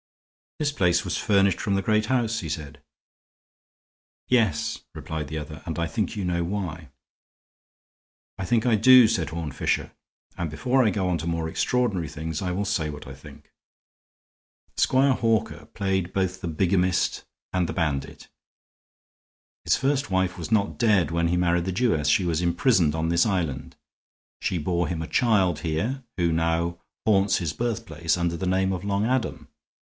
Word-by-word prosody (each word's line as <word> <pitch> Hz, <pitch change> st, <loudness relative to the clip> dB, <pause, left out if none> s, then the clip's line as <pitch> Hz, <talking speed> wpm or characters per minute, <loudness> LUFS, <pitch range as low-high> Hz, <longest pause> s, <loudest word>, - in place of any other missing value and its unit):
"This 150 Hz, -1 st, 0 dB
place 90 Hz, -9 st, +2 dB
was -, -, -2 dB
furnished 100 Hz, -3 st, +2 dB
from 100 Hz, -, -1 dB
the 95 Hz, -, +1 dB
great 110 Hz, +1 st, +1 dB
house," 115 Hz, -3 st, +1 dB
he 80 Hz, -, -5 dB
said. 75 Hz, -1 st, -6 dB, 1.5 s
"Yes," 115 Hz, -10 st, +1 dB, 0.2 s
replied 80 Hz, -2 st, -5 dB
the 80 Hz, +2 st, -5 dB
other, 75 Hz, +1 st, -7 dB
"and 80 Hz, -2 st, -4 dB
I 85 Hz, -1 st, 0 dB
think 110 Hz, +3 st, -2 dB
you 100 Hz, -3 st, -3 dB
know 85 Hz, -1 st, 0 dB
why." 85 Hz, -5 st, -4 dB, 1.5 s
"I 95 Hz, -, -4 dB
think 115 Hz, +3 st, +1 dB
I 120 Hz, -3 st, +4 dB
do," 125 Hz, +2 st, +8 dB
said 95 Hz, -9 st, -1 dB
Horne 80 Hz, -1 st, -4 dB
Fisher, -, -, -1 dB, 0.5 s
"and 85 Hz, -2 st, -2 dB
before 125 Hz, -, +1 dB
I 110 Hz, -, +3 dB
go 95 Hz, -1 st, -1 dB
on 90 Hz, -, +1 dB
to 80 Hz, -, -5 dB
more 85 Hz, -1 st, -1 dB
extraordinary 105 Hz, -4 st, 0 dB
things 80 Hz, +1 st, -5 dB
I 90 Hz, -2 st, -2 dB
will, 100 Hz, +3 st, -1 dB
say 80 Hz, -5 st, -1 dB
what 75 Hz, 0 st, -10 dB
I 70 Hz, -, -8 dB
think. 65 Hz, -, -15 dB, 1.3 s
Squire 135 Hz, +1 st, +4 dB
Hawker 115 Hz, -3 st, 0 dB
played 95 Hz, -2 st, -2 dB
both 95 Hz, -1 st, -1 dB
the -, -, -4 dB
bigamist 90 Hz, +2 st, +1 dB, 0.3 s
and 90 Hz, -2 st, +1 dB
the -, -, -3 dB
bandit. 75 Hz, -6 st, -3 dB, 1.4 s
His -, -, +3 dB
first 135 Hz, -3 st, 0 dB
wife 95 Hz, -1 st, 0 dB
was 85 Hz, +5 st, -6 dB
not 105 Hz, -2 st, +1 dB
dead 105 Hz, -9 st, +3 dB
when 85 Hz, 0 st, +1 dB
he 90 Hz, +1 st, +1 dB
married 85 Hz, -1 st, +1 dB
the 95 Hz, -, -1 dB
Jewess; 90 Hz, -7 st, +1 dB
she 90 Hz, +5 st, +3 dB
was 85 Hz, -1 st, 0 dB
imprisoned 85 Hz, -, +2 dB
on 80 Hz, +1 st, -1 dB
this 85 Hz, 0 st, +3 dB
island. 80 Hz, -10 st, -2 dB, 0.7 s
She 90 Hz, -, -1 dB
bore 85 Hz, +1 st, 0 dB
him 80 Hz, 0 st, -3 dB
a 80 Hz, -, -4 dB
child 100 Hz, -, +2 dB
here, 100 Hz, -, -2 dB
who 85 Hz, -2 st, +2 dB
now 85 Hz, +1 st, 0 dB, 0.3 s
haunts 100 Hz, -2 st, +3 dB
his 80 Hz, -4 st, -2 dB
birthplace 85 Hz, -9 st, -2 dB
under 85 Hz, -1 st, -1 dB
the 95 Hz, -, -3 dB
name 95 Hz, +1 st, +1 dB
of 90 Hz, -1 st, -4 dB
Long 100 Hz, +1 st, 0 dB
Adam. 130 Hz, 0 st, -1 dB
90 Hz, 170 wpm, -25 LUFS, 80-105 Hz, 1.5 s, do